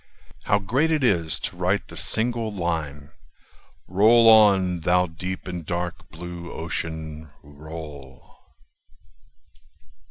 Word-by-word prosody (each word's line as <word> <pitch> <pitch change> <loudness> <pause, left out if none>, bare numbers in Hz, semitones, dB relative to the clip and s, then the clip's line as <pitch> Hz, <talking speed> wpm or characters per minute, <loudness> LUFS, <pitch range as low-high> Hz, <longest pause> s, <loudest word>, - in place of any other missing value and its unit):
How 100 - +3
great 125 +11 0
it 155 -3 +1
is 85 -9 +1
to 105 - -4
write 90 +3 -1
the - - -11
single 115 -1 0
line: 80 -6 -4 0.8
"Roll 110 +5 +5
on, 100 -5 +5
thou 90 +2 +2
deep 90 +3 -6
and 90 -2 -5
dark 85 +2 -4
blue 85 -1 -8
Ocean, 80 -1 -5
roll! 75 -2 -11
90 Hz, 105 wpm, -24 LUFS, 80-100 Hz, 0.8 s, Roll